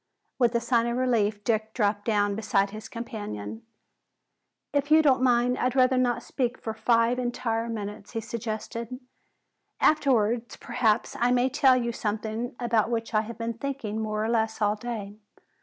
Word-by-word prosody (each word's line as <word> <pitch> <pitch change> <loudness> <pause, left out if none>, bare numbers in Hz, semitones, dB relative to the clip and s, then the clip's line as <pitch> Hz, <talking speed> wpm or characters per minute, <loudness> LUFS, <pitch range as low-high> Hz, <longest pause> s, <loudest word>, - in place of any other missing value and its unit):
With 240 -1 +3
a - - +4
sigh 235 0 +1
of 235 +1 -1
relief 220 -5 +1
Dick 220 0 -1
dropped 205 -3 0
down 205 -2 +2
beside 200 -2 +1
his 215 +1 -8
companion. 110 - -6 1.1
"If 285 0 0
you 315 +1 +6
don't 265 -4 +4
mind, 245 0 +3
I'd 250 +1 0
rather 255 0 +4
not 245 -2 +1
speak 250 -2 -2
for 220 - -5
five 230 +2 +2
entire 235 -2 -2
minutes," 205 -1 -6
he 225 - -1
suggested. 230 +2 -5 0.8
"Afterwards 240 -6 +2
perhaps 235 -2 0
I 240 - +3
may 250 +1 +3
tell 260 0 +4
you 235 -1 -1
something 220 +3 -3
about 230 -3 +1
which 230 -1 -2
I 215 - +4
have 225 +2 -8
been 230 0 -3
thinking 230 -4 -4
more 215 0 -1
or - - -1
less 220 -1 0
all 210 -1 +2
day. 210 -3 -6
230 Hz, 165 wpm, -27 LUFS, 215-245 Hz, 1.1 s, you